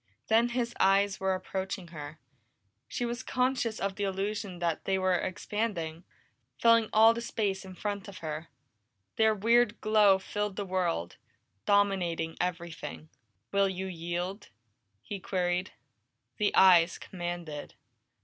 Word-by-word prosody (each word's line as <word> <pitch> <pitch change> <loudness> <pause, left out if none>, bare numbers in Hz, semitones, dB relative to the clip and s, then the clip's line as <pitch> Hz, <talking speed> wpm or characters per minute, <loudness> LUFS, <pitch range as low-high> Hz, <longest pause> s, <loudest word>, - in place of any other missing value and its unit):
Then 230 +2 +4
his 240 -1 -1
eyes 195 +1 +3
were 190 0 +1
approaching 190 -1 -4
her; 150 -2 -8 0.7
she 245 - -2
was 240 +1 -3
conscious 250 -3 0
of 195 -1 -2
the 205 - -2
illusion 195 0 -2
that 170 -2 -2
they 190 -1 +1
were 185 -1 +2
expanding, 180 -3 -2 0.5
filling 230 -1 +5
all 225 +1 +7
the 235 - -4
space 205 -4 -2
in 190 -1 -10
front 205 0 -4
of 200 - -9
her. 155 0 -5 0.7
Their 220 -1 +4
weird 230 +2 +3
glow 210 -2 +5
filled 205 +1 -3
the 205 - -3
world, 180 - -1 0.5
dominated 185 -5 +2
everything. 170 -3 -4 0.4
"Will 200 0 +3
you 190 0 -4
yield?" 175 +2 -4 0.5
he 200 +7 -5
queried. 180 0 -1 0.7
The 210 -2 +2
eyes 180 -2 +6
commanded. 175 -4 -6
190 Hz, 130 wpm, -30 LUFS, 175-210 Hz, 0.7 s, all